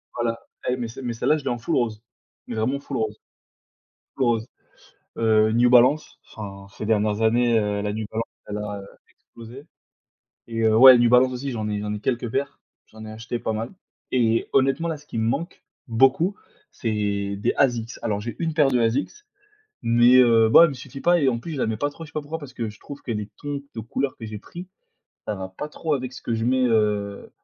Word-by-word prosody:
voilà 115 Hz, -1 st, -1 dB, 0.3 s
et 125 Hz, -, 0 dB
mais, 120 Hz, -2 st, -3 dB
celle 125 Hz, +3 st, -9 dB
mais 120 Hz, -, -2 dB
celle-là, 150 Hz, +6 st, +1 dB
je 145 Hz, -, -8 dB
l'ai 135 Hz, -, -1 dB
en 120 Hz, -, -1 dB
full 115 Hz, -, -2 dB
rose, 115 Hz, -3 st, -1 dB, 0.4 s
vraiment 120 Hz, +4 st, -1 dB
full 140 Hz, -1 st, -5 dB
rose 110 Hz, -1 st, -2 dB, 1.0 s
full 135 Hz, -, 0 dB
rose, 115 Hz, -1 st, +1 dB, 0.7 s
heu, 110 Hz, -1 st, +3 dB
New 120 Hz, +2 st, +4 dB
Balance. 125 Hz, +5 st, +4 dB, 0.2 s
Enfin 100 Hz, -2 st, -8 dB
ces 105 Hz, -, -4 dB
dernières 105 Hz, 0 st, +1 dB
années, 115 Hz, +1 st, +3 dB
heu, 105 Hz, -1 st, -1 dB
la 105 Hz, 0 st, -2 dB
New 110 Hz, 0 st, -3 dB
Balance, 115 Hz, +1 st, -4 dB
elle 105 Hz, -, -4 dB
a, 105 Hz, -1 st, -5 dB
heu, -, -, -11 dB, 0.3 s
explosé 120 Hz, +5 st, -13 dB, 0.8 s
et 115 Hz, -1 st, -3 dB
heu, 110 Hz, -1 st, +4 dB
ouais, 130 Hz, +1 st, +10 dB
New 120 Hz, 0 st, +4 dB
Balance 125 Hz, +1 st, +5 dB
aussi, 135 Hz, +2 st, -4 dB
j'en 110 Hz, -2 st, -3 dB
ai 105 Hz, 0 st, -2 dB
j'en 105 Hz, 0 st, -3 dB
ai 105 Hz, -, -4 dB
quelques 120 Hz, 0 st, -2 dB
paires. 140 Hz, +1 st, -2 dB, 0.3 s
J'en 110 Hz, 0 st, -12 dB
ai 110 Hz, -, -8 dB
acheté 115 Hz, +2 st, -5 dB
pas 110 Hz, -, -2 dB
mal 110 Hz, +2 st, -4 dB, 0.4 s
et 115 Hz, -3 st, +2 dB
honnêtement 135 Hz, +5 st, +2 dB
là, 160 Hz, -, -3 dB
ce 145 Hz, -, -19 dB
qui 115 Hz, -, -6 dB
me 110 Hz, -, +1 dB
manque, 165 Hz, +9 st, -3 dB, 0.2 s
beaucoup, 135 Hz, -, +3 dB, 0.4 s
c'est 100 Hz, -3 st, -2 dB
des 100 Hz, -, 0 dB
Asics. 120 Hz, -3 st, +1 dB
Alors 105 Hz, -2 st, -1 dB
j'ai 120 Hz, +2 st, -5 dB
une 165 Hz, -1 st, -1 dB
paire 150 Hz, -3 st, +4 dB
de 125 Hz, -2 st, +2 dB
Asics, 115 Hz, +5 st, +1 dB, 0.7 s
mais, 120 Hz, +1 st, +5 dB
heu, 115 Hz, -3 st, +6 dB
bon 110 Hz, -, +8 dB
elle 170 Hz, -, +7 dB
me -, -, -6 dB
suffit 135 Hz, +1 st, -10 dB
pas 175 Hz, +1 st, +3 dB
et 140 Hz, -, +3 dB
en 120 Hz, -2 st, 0 dB
plus 165 Hz, +7 st, -7 dB
je 145 Hz, -, -4 dB
la -, -, +1 dB
mets 110 Hz, 0 st, -1 dB
pas 145 Hz, +6 st, -1 dB
trop, 165 Hz, +3 st, -10 dB
je -, -, -12 dB
sais -, -, -32 dB
pas 155 Hz, -, -2 dB
pourquoi, 155 Hz, +3 st, -6 dB
parce 145 Hz, -4 st, -10 dB
que 115 Hz, -2 st, -3 dB
je 105 Hz, -, -17 dB
trouve 145 Hz, 0 st, -10 dB
que 120 Hz, -, -3 dB
les 105 Hz, -2 st, -4 dB
tons 145 Hz, -1 st, -5 dB
de 115 Hz, -, -4 dB
couleur 130 Hz, +5 st, -3 dB
que 115 Hz, -, -8 dB
j'ai 105 Hz, -1 st, -6 dB
pris, 175 Hz, -, -10 dB, 0.6 s
ça 105 Hz, -, -1 dB
va 95 Hz, -1 st, -6 dB
pas 150 Hz, +11 st, -7 dB
trop 155 Hz, +1 st, -2 dB
avec 130 Hz, -1 st, -5 dB
ce -, -, -10 dB
que 115 Hz, -, -3 dB
je 115 Hz, +1 st, -2 dB
mets, 130 Hz, +1 st, +2 dB
heu, 105 Hz, -3 st, 0 dB
115 Hz, 230 wpm, -24 LUFS, 110-135 Hz, 1.0 s, ouais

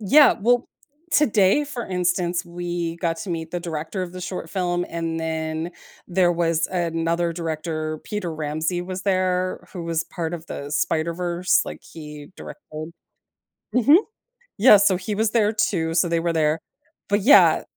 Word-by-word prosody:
Yeah, 280 Hz, +8 st, +6 dB
well 245 Hz, +3 st, +2 dB, 0.4 s
today, 220 Hz, -1 st, +4 dB
for 260 Hz, -5 st, -6 dB
instance, 180 Hz, -1 st, 0 dB
we 175 Hz, -1 st, -4 dB
got 170 Hz, -1 st, -1 dB
to 185 Hz, -, -6 dB
meet 165 Hz, -1 st, -4 dB
the 175 Hz, -, -3 dB
director 165 Hz, +3 st, -4 dB
of 180 Hz, -1 st, -6 dB
the 185 Hz, -, -7 dB
short 180 Hz, +1 st, -5 dB
film, 175 Hz, -2 st, -1 dB
and 165 Hz, -1 st, -3 dB
then 160 Hz, +1 st, -3 dB, 0.4 s
there 175 Hz, -1 st, +3 dB
was 165 Hz, -1 st, +1 dB
another 170 Hz, -1 st, -1 dB
director, 155 Hz, -1 st, -3 dB
Peter 185 Hz, -6 st, -4 dB
Ramsey 155 Hz, +3 st, -2 dB
was 185 Hz, +1 st, -6 dB
there 185 Hz, -1 st, 0 dB
who 175 Hz, -, -6 dB
was 165 Hz, -1 st, -1 dB
part 170 Hz, -1 st, -4 dB
of 165 Hz, -1 st, -8 dB
the 140 Hz, -3 st, -6 dB
Spider-Verse, 170 Hz, +3 st, +1 dB
like -, -, -8 dB
he 150 Hz, -2 st, -10 dB
directed. 155 Hz, -, -9 dB, 0.8 s
Mhm. 250 Hz, +6 st, +6 dB, 0.6 s
Yes, 205 Hz, -2 st, +7 dB
so 185 Hz, -, +3 dB
he 200 Hz, +3 st, -4 dB
was 220 Hz, +1 st, +1 dB
there 215 Hz, -2 st, +2 dB
too, 175 Hz, -6 st, 0 dB
so 175 Hz, +1 st, +2 dB
they 170 Hz, 0 st, +1 dB
were 170 Hz, 0 st, -1 dB
there. 155 Hz, 0 st, +1 dB, 0.5 s
But 205 Hz, +1 st, +2 dB
yeah 245 Hz, +9 st, +6 dB
175 Hz, 160 wpm, -23 LUFS, 165-190 Hz, 0.8 s, Yes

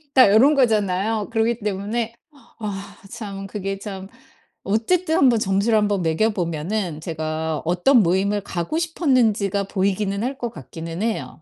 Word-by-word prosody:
다 255 Hz, -6 st, +8 dB
요런 275 Hz, +7 st, +6 dB
거잖아요. 215 Hz, -3 st, +1 dB
그러기 230 Hz, +1 st, +1 dB
때문에 215 Hz, +3 st, -3 dB, 0.4 s
아 200 Hz, -2 st, -6 dB
참 200 Hz, -4 st, -7 dB
그게 195 Hz, 0 st, -4 dB
참. 195 Hz, -2 st, -7 dB, 0.6 s
어쨌든 320 Hz, -, +1 dB
1 270 Hz, -, +5 dB
번 235 Hz, -3 st, +4 dB
점수를 200 Hz, +3 st, +2 dB
한번 205 Hz, -3 st, +1 dB
매겨 165 Hz, +8 st, +2 dB
보면은 170 Hz, -2 st, -3 dB
제가 160 Hz, -1 st, -3 dB
어떤 180 Hz, +9 st, +4 dB
모임을 195 Hz, +3 st, +1 dB
가고 180 Hz, -, -3 dB
싶었는지가 240 Hz, -, +1 dB
보이기는 200 Hz, +1 st, -1 dB
할 265 Hz, +2 st, -3 dB
것 240 Hz, -4 st, -4 dB
같기는 165 Hz, -, -7 dB
해요. 225 Hz, -6 st, -3 dB
205 Hz, 300 characters per minute, -22 LUFS, 185-230 Hz, 0.6 s, 다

